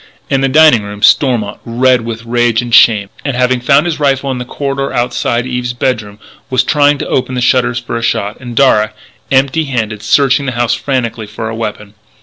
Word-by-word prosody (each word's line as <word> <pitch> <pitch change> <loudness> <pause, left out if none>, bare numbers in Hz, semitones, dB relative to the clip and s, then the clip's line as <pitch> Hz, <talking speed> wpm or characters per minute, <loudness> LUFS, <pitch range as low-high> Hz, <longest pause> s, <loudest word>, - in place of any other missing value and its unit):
In 135 -1 +2
the 135 - +1
dining 155 -5 +5
room, 105 +1 -9
Stormont, 115 -5 +2
red 125 +1 +2
with 115 0 -6
rage 120 -1 +1
and 120 -1 -4
shame, 105 -5 +4
and 140 -3 -2
having 125 0 +1
found 140 +5 +3
his 170 -3 -2
rifle 140 -1 0
in 130 - -4
the 125 - -5
corridor 140 +1 -3
outside 120 0 -1
Eve's 125 -1 -3
bedroom, 110 -5 -3 0.3
was 130 -1 +2
trying 145 +1 +2
to - - -5
open 130 0 -1
the - - -1
shutters 125 -1 +1
for 120 -1 -5
a 115 - -2
shot; 105 -2 -2
and 120 -2 -8
Darragh, 110 -6 +3 0.4
empty 140 +4 +2
handed, 110 -6 -3
searched 135 +5 +2
the 130 -2 -3
house 120 -1 0
frantically 115 -3 -3
for 110 +2 -6
a 110 - -5
weapon. 105 -2 -6
125 Hz, 200 wpm, -13 LUFS, 115-135 Hz, 0.4 s, dining